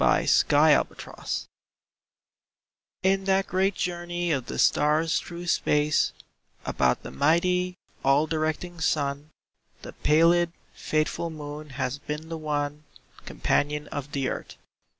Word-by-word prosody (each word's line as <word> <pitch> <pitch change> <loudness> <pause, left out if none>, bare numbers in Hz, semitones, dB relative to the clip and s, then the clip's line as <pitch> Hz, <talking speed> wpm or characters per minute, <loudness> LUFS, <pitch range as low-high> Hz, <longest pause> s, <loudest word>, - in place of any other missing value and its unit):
A - - +3
SOLAR - - +5
ECLIPSE - - -6 1.6
In 190 0 +2
that 195 0 +2
great 190 +1 +1
journey 175 0 -2
of 135 -5 -1
the - - -5
stars 155 +2 +3
through 175 0 -8
space 150 -3 +2 0.5
About 65 -1 +1
the - - -7
mighty, 180 - +1 0.3
all 140 +3 +4
directing 160 +2 -2
Sun, 145 -1 0 0.5
The - - -8
pallid, 170 +2 +3 0.2
faithful 155 +2 -1
Moon 150 -1 -8
has 130 +2 -2
been 150 +2 -6
the 165 - -4
one 150 -1 -2 0.4
Companion 150 +1 0
of 145 0 -6
the 135 -2 0
Earth. - - -5
155 Hz, 120 wpm, -26 LUFS, 145-175 Hz, 1.6 s, SOLAR